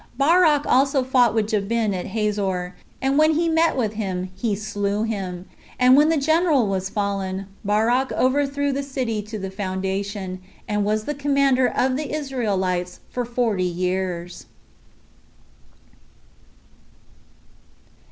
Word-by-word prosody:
Barak 300 Hz, 0 st, +4 dB
also 270 Hz, +1 st, +3 dB
fought 250 Hz, -3 st, +3 dB
with 215 Hz, -1 st, +1 dB
Jabin 215 Hz, 0 st, 0 dB
at 180 Hz, -1 st, -4 dB
Hazor; 195 Hz, -4 st, -2 dB, 0.3 s
and 270 Hz, +2 st, +2 dB
when 310 Hz, 0 st, +4 dB
he 335 Hz, +2 st, +1 dB
met 325 Hz, -2 st, +2 dB
with 220 Hz, -4 st, 0 dB
him, 185 Hz, -4 st, -3 dB
he 205 Hz, +1 st, -1 dB
slew 205 Hz, 0 st, -2 dB
him: 190 Hz, -5 st, -4 dB, 0.3 s
and 250 Hz, 0 st, +6 dB
when 295 Hz, +2 st, +5 dB
the 325 Hz, -, +2 dB
general 315 Hz, -2 st, +3 dB
was 190 Hz, -1 st, -2 dB
fallen, 195 Hz, -2 st, -2 dB, 0.2 s
Barak 225 Hz, +6 st, +1 dB
overthrew 280 Hz, +2 st, +1 dB
the 275 Hz, +1 st, -1 dB
city 255 Hz, -6 st, -3 dB
to 215 Hz, +1 st, -7 dB
the 190 Hz, -1 st, -5 dB
foundation, 190 Hz, 0 st, -4 dB, 0.3 s
and 210 Hz, -1 st, 0 dB
was 215 Hz, +1 st, 0 dB
the 295 Hz, -, -3 dB
commander 275 Hz, -3 st, +2 dB
of 255 Hz, +1 st, 0 dB
the 300 Hz, 0 st, -4 dB
Israelites 195 Hz, -11 st, -2 dB
for 245 Hz, -1 st, -2 dB
forty 230 Hz, -5 st, 0 dB
years. 180 Hz, 0 st, -3 dB
220 Hz, 130 wpm, -22 LUFS, 195-270 Hz, 0.3 s, and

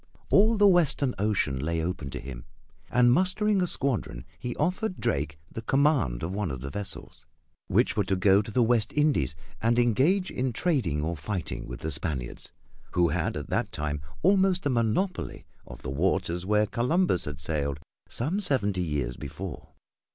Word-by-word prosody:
All 215 Hz, +3 st, +5 dB
the 205 Hz, -, +5 dB
western 150 Hz, -8 st, +3 dB
ocean 100 Hz, -10 st, +1 dB
lay 80 Hz, +3 st, -1 dB
open 80 Hz, -4 st, -3 dB
to -, -, -5 dB
him, 65 Hz, -3 st, -8 dB, 0.4 s
and 120 Hz, 0 st, +4 dB
mustering 195 Hz, +5 st, +2 dB
a 180 Hz, -, +1 dB
squadron 115 Hz, -, -2 dB
he 120 Hz, -1 st, -4 dB
offered 185 Hz, +5 st, -1 dB
Drake 75 Hz, +1 st, -1 dB
the 115 Hz, -, -5 dB
command 135 Hz, -, +2 dB
of 85 Hz, +3 st, -3 dB
one 100 Hz, -2 st, -1 dB
of 65 Hz, -3 st, -5 dB
the 70 Hz, +1 st, -5 dB
vessels, 100 Hz, +3 st, -4 dB, 0.4 s
which -, -, +2 dB
were 105 Hz, -, +2 dB
to 95 Hz, 0 st, +1 dB
go 95 Hz, +2 st, +4 dB
to 105 Hz, -, -8 dB
the 120 Hz, +3 st, +2 dB
West 115 Hz, -2 st, +2 dB
Indies 145 Hz, -, +2 dB, 0.3 s
and 115 Hz, +1 st, +2 dB
engage 135 Hz, -, +3 dB
in 130 Hz, -1 st, -1 dB
trading 110 Hz, -, 0 dB
or 85 Hz, +2 st, -1 dB
fighting 85 Hz, +4 st, -4 dB
with -, -, -7 dB
the 80 Hz, -, -3 dB
Spaniards, 70 Hz, -4 st, -3 dB, 0.4 s
who 85 Hz, -1 st, +3 dB
had -, -, -1 dB
at -, -, -7 dB
that -, -, 0 dB
time 75 Hz, -1 st, -3 dB, 0.2 s
almost 190 Hz, -1 st, +3 dB
a 140 Hz, -, +2 dB
monopoly 125 Hz, -, -1 dB, 0.2 s
of -, -, -11 dB
the -, -, -4 dB
waters 90 Hz, +3 st, 0 dB
where 105 Hz, +1 st, +3 dB
Columbus 125 Hz, -, +1 dB
had 75 Hz, -1 st, -6 dB
sailed 75 Hz, -2 st, -2 dB, 0.3 s
some 155 Hz, -, -1 dB
seventy 105 Hz, -, +1 dB
years 70 Hz, -7 st, -2 dB
before. 80 Hz, +2 st, -7 dB
105 Hz, 175 wpm, -27 LUFS, -, 0.4 s, All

